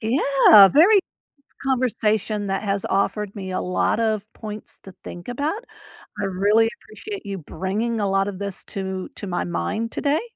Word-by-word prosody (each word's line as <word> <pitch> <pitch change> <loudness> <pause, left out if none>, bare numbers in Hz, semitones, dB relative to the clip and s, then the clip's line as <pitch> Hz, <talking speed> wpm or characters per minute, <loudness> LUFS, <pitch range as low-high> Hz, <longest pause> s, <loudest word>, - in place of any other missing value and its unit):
Yeah, 225 -4 +6
very 365 - +6 0.7
conversation 220 -5 0
that 195 +1 -2
has 200 -1 -1
offered 200 +1 -1
me 190 -2 -6
a 185 - -1
lot 180 +4 0
of 215 -1 -1
points 210 -1 -6
to 195 - -12
think 175 +3 -9
about. 295 - -2 0.6
I - - 0
really 205 +4 +3
appreciate 400 - -8
you 200 -1 -4
bringing 210 +7 -3
a 200 -1 0
lotta 195 +1 +1
this 200 0 -4
to 190 -1 -5
to 205 - -6
my 175 - -1
mind 215 +6 -3
today. 290 +2 0
210 Hz, 155 wpm, -22 LUFS, 195-230 Hz, 0.7 s, Yeah